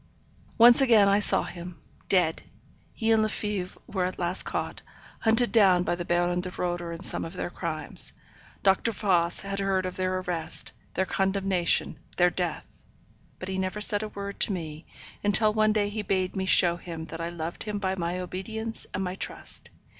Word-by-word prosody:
Once 240 +2 +8
again 225 -6 +5
I 200 +1 +4
saw 210 - +4
him. 175 -2 -8 0.3
Dead. 175 -4 +2 0.5
He 225 -1 -1
and 220 -1 +4
Lefebvre 210 -3 -3
were 185 -3 -2
at 185 - -4
last 175 +1 +1
caught; - - -4 0.4
hunted 225 +2 +2
down 190 -6 +5
by - - 0
the 175 0 -3
Baron 175 +1 +1
de 180 - -3
Roeder 175 -1 -3
in 170 +2 -7
some - - -1
of 165 - -7
their - - -4
crimes. 165 -4 +1 0.5
Dr. 195 +4 +2
Voss 175 -5 +1
had 195 0 -4
heard 195 -1 0
of 185 - -5
their 185 0 0
arrest; 175 -3 -3 0.2
their 190 - +1
condemnation, 190 -4 +1 0.2
their 180 0 +4
death; 175 -3 -4 0.6
but 185 - -7
he 190 0 -3
never 190 +2 -2
said 205 0 +3
a 215 - -3
word 200 -1 -7
to - - +2
me, 160 -3 -6 0.4
until 210 +1 +4
one 215 0 +3
day 210 -1 +1
he 210 +1 -3
bade 185 -2 -1
me 190 -1 -1
show 175 -2 +5
him 165 -2 -7
that 165 0 -7
I 165 - -3
loved 170 0 -6
him 210 -1 -3
by 190 -2 -1
my 175 -1 -2
obedience 220 +5 -5
and 190 - -1
my 180 -1 -3
trust. 190 - -2
185 Hz, 185 wpm, -27 LUFS, 175-205 Hz, 0.6 s, Once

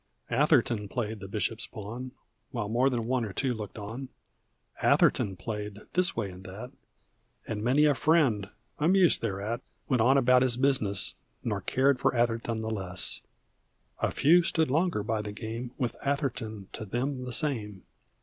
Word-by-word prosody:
Atherton 120 -5 +3
played 110 -2 -3
the 95 - -7
bishop's 110 +2 -2
pawn 120 +3 -7 0.4
While 115 -5 -3
more 125 +4 +3
than 120 -3 -1
one 125 0 +1
or 105 -3 -4
two 130 +3 0
looked 105 -3 -7
on; 115 +6 -6 0.7
Atherton 95 -2 +3
played 105 0 -5
this 180 0 +2
way 105 -4 -2
and 90 +1 -11
that, 105 +7 -8 0.8
And 105 -1 -3
many 135 +6 +4
a 150 - +5
friend, 135 -10 +2 0.3
amused 180 +3 +4
thereat, 105 +1 -2 0.3
Went 130 -5 +2
on 130 +4 +5
about 125 -1 +5
his 125 -2 +2
business 125 -8 +1 0.3
Nor 105 -3 -1
cared 135 +6 +2
for - - +2
Atherton 115 -1 0
the 110 0 -3
less; 95 -4 -2 0.8
A - - +1
few 170 +5 +5
stood 160 -4 +1
longer 160 - +1
by 110 0 -1
the 105 -1 -5
game. 115 +3 -5
With 125 -4 -1
Atherton 115 -8 -2
to - - -5
them 125 +5 -2
the 125 - -5
same. 110 - 0
115 Hz, 160 wpm, -29 LUFS, 105-135 Hz, 0.8 s, a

